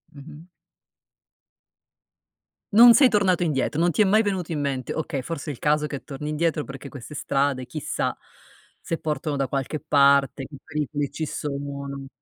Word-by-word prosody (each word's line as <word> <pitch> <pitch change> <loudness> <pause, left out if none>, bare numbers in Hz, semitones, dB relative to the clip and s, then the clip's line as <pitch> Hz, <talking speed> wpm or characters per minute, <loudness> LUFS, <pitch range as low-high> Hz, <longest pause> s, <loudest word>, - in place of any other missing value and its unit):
Mh-mh. 150 +3 -12 2.3
Non 235 +3 +9
sei 260 +3 +7
tornato 195 -6 +2
indietro, 150 -1 -1
non 175 +1 +3
ti 190 - +1
è - - +6
mai 215 +3 +4
venuto 190 -5 -2
in 155 - -2
mente: 135 -3 -2
"Okay, 150 -4 -3
forse 155 +1 -5
è - - -5
il - - -13
caso 150 0 +1
che 140 -4 -6
torni 145 +1 -7
indietro 155 0 0
perché 135 +1 -9
queste 140 +2 -10
strade 140 -2 0
chissà 155 +3 -3 0.7
se 165 - -3
portano 150 -1 -3
da 135 -1 0
qualche 135 +3 -3
parte, 140 -2 +3
che 140 - -11
pericoli 145 -2 -2
ci 160 - -4
sono." 140 -1 -5
150 Hz, 160 wpm, -24 LUFS, 140-165 Hz, 2.3 s, Non